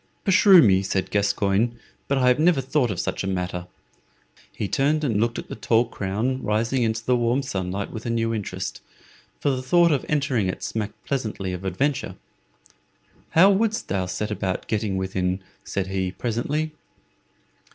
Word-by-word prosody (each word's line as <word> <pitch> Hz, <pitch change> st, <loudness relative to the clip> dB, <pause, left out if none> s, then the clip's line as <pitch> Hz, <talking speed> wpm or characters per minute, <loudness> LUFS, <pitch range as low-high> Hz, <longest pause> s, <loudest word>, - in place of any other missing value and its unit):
"Beshrew 190 Hz, -3 st, +7 dB
me," 95 Hz, -2 st, +4 dB
said 95 Hz, -1 st, -2 dB
Gascoyne, 100 Hz, +3 st, +1 dB, 0.3 s
"but 140 Hz, -, +1 dB
I 130 Hz, -1 st, +3 dB
have 125 Hz, -, +3 dB
never 165 Hz, -2 st, +4 dB
thought 130 Hz, -1 st, +1 dB
of 95 Hz, -4 st, -3 dB
such -, -, -2 dB
a -, -, -2 dB
matter." 90 Hz, -1 st, -3 dB, 0.8 s
He 105 Hz, -, -3 dB
turned 140 Hz, -, +1 dB
and 110 Hz, -7 st, +1 dB
looked 115 Hz, +1 st, 0 dB
at -, -, -6 dB
the -, -, -7 dB
tall 115 Hz, +1 st, +2 dB
crown 115 Hz, +5 st, -2 dB
rising 115 Hz, +5 st, 0 dB
into 115 Hz, -1 st, -1 dB
the 125 Hz, -, +3 dB
warm 120 Hz, +3 st, +1 dB
sunlight 95 Hz, -5 st, -3 dB
with 110 Hz, +1 st, -6 dB
a -, -, -1 dB
new 115 Hz, 0 st, 0 dB
interest, 95 Hz, -4 st, -4 dB, 0.6 s
for 145 Hz, -, +1 dB
the 130 Hz, -1 st, -2 dB
thought 170 Hz, +6 st, +4 dB
of 140 Hz, -4 st, +1 dB
entering 140 Hz, -9 st, +1 dB
it 95 Hz, -, -4 dB
smacked 110 Hz, -2 st, -4 dB
pleasantly 110 Hz, -8 st, -2 dB
of 90 Hz, +1 st, -6 dB
adventure. 130 Hz, +10 st, -1 dB, 1.2 s
"How 190 Hz, +4 st, +8 dB
wouldst 220 Hz, +3 st, 0 dB
thou 95 Hz, -2 st, -1 dB
set 105 Hz, +4 st, -3 dB
about 95 Hz, -2 st, -2 dB
getting 105 Hz, -3 st, -1 dB
within?" 95 Hz, 0 st, -1 dB, 0.2 s
said 100 Hz, -, -2 dB
he, 95 Hz, -1 st, -2 dB
presently. 130 Hz, +9 st, -2 dB
115 Hz, 170 wpm, -24 LUFS, 95-135 Hz, 1.2 s, How